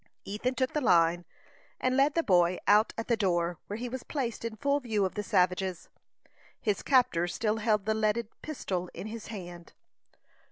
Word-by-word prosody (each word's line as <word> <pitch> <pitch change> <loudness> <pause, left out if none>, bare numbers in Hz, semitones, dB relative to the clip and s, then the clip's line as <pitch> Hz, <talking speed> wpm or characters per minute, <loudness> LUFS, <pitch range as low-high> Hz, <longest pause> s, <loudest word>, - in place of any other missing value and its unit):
Ethan 230 +6 -2
took 260 -1 0
the 300 - 0
line, 175 -5 +3 0.5
and 255 0 +1
led 275 +2 +3
the 335 - +2
boy 180 - +3
out 210 +2 +5
at 225 - -4
the 235 - +3
door, 175 -5 0
where 205 - -4
he 245 +2 -4
was 255 +1 -5
placed 245 -6 -4
in 230 -1 -4
full 280 +4 +1
view 220 -6 0
of 185 - -3
the 210 - -2
savages. 185 -2 0 0.7
His 205 -3 -1
captor 240 -11 +3
still 215 +4 -1
held 210 -2 +1
the 220 - +2
leaded 215 +1 0
pistol 185 - -4
in - - -6
his 220 0 -7
hand. 175 -5 -9
215 Hz, 185 wpm, -29 LUFS, 180-240 Hz, 0.7 s, out